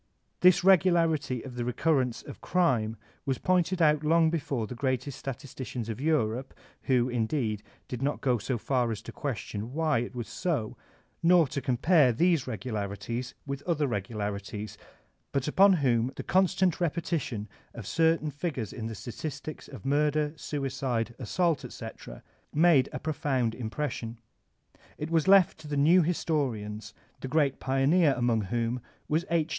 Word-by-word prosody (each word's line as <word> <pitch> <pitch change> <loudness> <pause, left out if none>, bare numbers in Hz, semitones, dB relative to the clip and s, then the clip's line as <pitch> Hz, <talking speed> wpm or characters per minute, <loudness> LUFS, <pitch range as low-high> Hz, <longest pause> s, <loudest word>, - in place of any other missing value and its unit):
This 180 -1 +5
regularity 165 -8 +3
of 130 - -8
the 120 -1 -3
re 125 +1 -2
currence 130 -7 +1
of - - -9
crime 120 -11 +1 0.3
was 135 -2 -1
pointed 180 +1 +1
out 150 -1 +4
long 160 +1 +4
before 140 -8 -2
by - - -12
the - - -5
greatest 130 0 -1
statisticians 130 -3 -6
of 115 +3 -4
Europe, 130 -5 0 0.3
who, 125 -2 +3
indeed, 115 -3 -1 0.3
did 125 -1 -5
not 145 +2 0
go 125 -4 +1
so 120 +4 -2
far 125 0 0
as 110 -1 -5
to - - -8
question 115 -4 -5
why 155 -4 +1
it 120 +2 -5
was 120 -2 -4
so, 145 -12 -2 0.5
nor 170 -1 +6
to 140 - -3
compare 135 +3 +4
that 165 +3 +2
regularities 115 +1 -4
with 140 -1 -4
other 155 -4 +1
regularities, 105 -2 -4 0.6
but 135 0 -1
upon 195 +6 +6
whom 125 -6 +2
the - - -5
constant 185 -1 +2
repetition 160 -10 -2 0.3
of 115 -4 -7
certain 160 +2 +2
figures 145 - -4
in 115 -2 -5
the 115 - -5
statistics 145 +8 -7
of 135 -1 -11
murder, 150 +1 +1
suicide, 130 -6 -2
assault, 165 - 0
etc., - - -9 0.3
made 155 -4 +4
a - - -4
profound 135 -5 -1
impres 130 +6 -3
sion. 115 0 -6 0.8
It 150 +2 -5
was 165 -1 +2
left 195 -4 +6
to 155 - -11
the 145 -1 -2
new 165 +6 +6
historians, 130 -11 -2 0.2
the - - -5
great 140 -1 +1
pioneer 135 +3 +3
among 120 -3 +2
whom 120 +4 -1 0.3
was 160 +3 0
H. 165 -1 +1
135 Hz, 155 wpm, -28 LUFS, 120-160 Hz, 0.8 s, nor